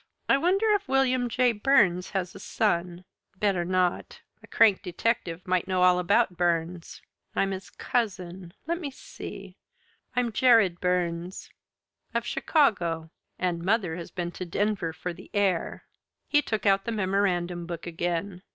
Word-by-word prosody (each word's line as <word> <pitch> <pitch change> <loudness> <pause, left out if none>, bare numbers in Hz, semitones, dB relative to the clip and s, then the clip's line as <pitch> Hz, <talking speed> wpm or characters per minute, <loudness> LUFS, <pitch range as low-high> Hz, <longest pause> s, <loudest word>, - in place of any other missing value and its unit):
"I - - +5
wonder 380 +7 +2
if 410 -1 +1
William 255 -2 +2
J. 250 +1 +3
Burns 205 -6 +3
has 190 -2 -3
a - - -10
son? 180 -4 -1 0.3
Better 195 -3 +1
not! 180 0 -1 0.2
A - - -15
crank 215 -4 +4
detective 180 -2 -2
might 185 -1 +1
know 185 -1 +1
all 180 0 +5
about 190 +2 +2
Burns. 170 0 -1 0.3
I'm 195 - +1
his 190 0 -6
cousin. 185 -6 -3
Let 340 +2 -1
me 295 - -3
see 265 - -10 0.6
I'm 245 -2 +1
Jared 220 -7 +4
Burns. 180 0 -2 0.6
Of - - 0
Chicago. 170 - +1 0.3
And 175 -2 -1
mother 190 -4 +1
has 170 -1 -7
been 175 -2 -4
to 185 - -6
Denver 200 -2 -1
for 175 +2 -5
the - - -14
air." 195 -4 0 0.4
He 295 - +4
took 220 -6 -3
out 195 -1 +3
the 235 - -2
memorandum 185 -4 0
book 170 -1 -6
again. 175 +2 -3
185 Hz, 150 wpm, -27 LUFS, 175-225 Hz, 0.6 s, I